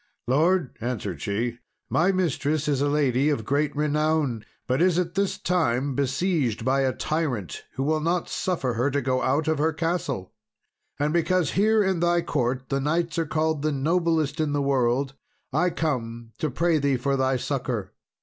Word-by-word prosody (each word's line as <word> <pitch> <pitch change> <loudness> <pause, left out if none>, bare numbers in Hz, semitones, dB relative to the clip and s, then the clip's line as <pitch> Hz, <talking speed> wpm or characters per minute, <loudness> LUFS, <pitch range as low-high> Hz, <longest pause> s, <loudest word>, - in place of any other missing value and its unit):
"Lord," 160 +3 +2
answered 105 - -3
she, 115 +6 -2 0.3
"my 175 +4 +2
mistress 155 -4 0
is 140 -2 +1
a 145 - +2
lady 140 -1 +2
of 115 -8 -1
great 145 +3 0
renown, 150 -5 +1 0.2
but 130 +4 0
is 180 -1 +4
at 175 -1 0
this 195 0 0
time 140 -6 0
besieged 140 - 0
by 135 +1 +2
a 135 -1 +2
tyrant, 130 - -3
who 135 - -2
will 155 +2 +1
not 170 +3 0
suffer 165 -9 -1
her 120 +5 +1
to 145 0 0
go 130 -1 0
out 145 +4 +1
of 160 -2 +1
her 160 +2 +2
castle; 155 - -2 0.6
and 145 +2 0
because 170 -2 +2
here 215 +3 +3
in 190 -3 0
thy 175 0 +2
court 125 +1 -1
the 135 0 0
knights 165 +3 0
are 165 - 0
called 155 -1 0
the 155 +1 +1
noblest 160 +1 +1
in 155 -2 0
the 145 - +1
world, 135 0 +1 0.4
I 175 +5 +3
come 120 -8 -3
to 155 - 0
pray 165 +4 +1
thee 140 -2 +1
for 140 +3 0
thy 130 -1 +1
succour. - - -3
145 Hz, 180 wpm, -25 LUFS, 130-165 Hz, 0.6 s, is